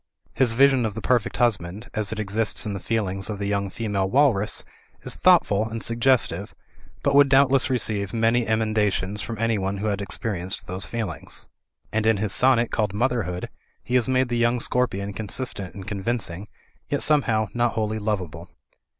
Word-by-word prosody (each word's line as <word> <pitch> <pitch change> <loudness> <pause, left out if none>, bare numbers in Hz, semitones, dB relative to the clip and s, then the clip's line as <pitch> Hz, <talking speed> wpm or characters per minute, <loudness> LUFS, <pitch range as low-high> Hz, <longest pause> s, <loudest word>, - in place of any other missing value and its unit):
His 125 -3 +3
vision 135 0 +4
of 110 -3 -2
the - - -3
perfect 125 -4 +1
husband, 105 -3 0
as 110 -2 -1
it 110 - -4
exists 110 +3 0
in 105 - -2
the 100 - -4
feelings 95 0 -2
of 105 - -3
the 100 - -3
young 100 -1 -1
female 100 -2 -2
walrus, 125 -5 +2 0.4
is - - -3
thoughtful 105 +2 +3
and 115 0 -5
suggestive; 120 +2 +1 0.5
but 140 - +2
would 140 0 +6
doubtless 135 0 +4
receive 105 -6 -1
many 115 +1 +1
emenda 110 -1 +1
tions 100 +3 -2
from 115 +1 -5
anyone 105 -3 0
who 100 - -4
had 100 -2 -1
experienced 100 -2 -4
those 90 -1 -5
feelings. 110 -5 -5 0.4
And 110 0 +1
in 110 -2 +4
his 105 -1 -1
sonnet 125 -2 +3
called 105 -3 -1
"Motherhood" 110 -7 -1 0.4
he 125 - -6
has 125 0 +3
made 130 -1 +2
the 120 -1 0
young 120 +1 +2
scorpion 100 -5 0
consistent 105 -2 -3
and 95 -1 -9
convincing, 100 -2 -3 0.4
yet - - 0
somehow 115 -8 +2
not 120 0 +1
wholly 110 0 -1
lovable. 100 -7 -3
110 Hz, 175 wpm, -24 LUFS, 100-120 Hz, 0.5 s, would